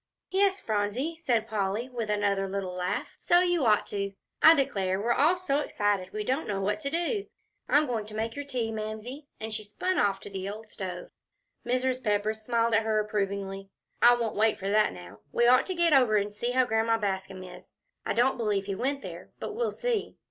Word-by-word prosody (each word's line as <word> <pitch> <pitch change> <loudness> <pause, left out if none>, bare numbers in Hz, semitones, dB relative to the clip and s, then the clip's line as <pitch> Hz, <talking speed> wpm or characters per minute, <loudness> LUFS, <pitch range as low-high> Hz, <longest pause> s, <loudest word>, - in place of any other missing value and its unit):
"Yes, 390 0 +3
Phronsie," 220 +9 -1
said 235 -8 0
Polly, 210 +2 -1
with 235 -4 -4
another 200 -2 +1
little 190 -2 -3
laugh, 180 0 -3
"so 350 0 +4
you 350 -7 +2
ought 210 -1 +4
to. 200 -1 -3 0.3
I 320 - +9
declare, 195 -9 0
we're 235 +3 +1
all 320 +8 +3
so 290 -6 0
excited 205 -9 -1
we 215 0 -3
don't 265 +8 -1
know 200 -2 -1
what 200 +2 0
to 280 -3 -3
do. 345 +6 -1 0.4
I'm 295 +1 +5
going 225 -6 -3
to 215 - -9
make 225 +1 -2
your 285 - -4
tea, 250 -5 -2
Mamsie," 220 +6 -6
and 220 0 -5
she 215 0 -4
spun 360 - -1
off 200 -1 +2
to - - -9
the 190 0 -4
old 215 +1 -8
stove. 180 -3 -6 0.6
Mrs. 255 +1 0
Pepper 210 0 +1
smiled 230 +1 0
at 225 - +5
her 220 -1 +1
approvingly. 195 -2 -3 0.3
"I 240 0 +8
won't 230 -3 -2
wait 220 +1 +3
for 195 +1 -3
that 215 0 +4
now; 90 +2 -11
we 235 - +2
ought 250 +1 +5
to 375 - -2
get 340 -2 +3
over 250 -6 +5
and 205 0 -1
see 235 +4 -2
how 255 +1 +3
Grandma 225 -1 +2
Bascom 190 -2 -3
is. 180 - -12 0.3
I - - -1
don't 250 +3 +2
believe 210 -4 0
he 200 - -2
went 275 +7 -2
there, - - -8
but - - -5
we'll 470 +2 -1
see." 485 -3 -2
220 Hz, 210 wpm, -28 LUFS, 205-260 Hz, 0.6 s, I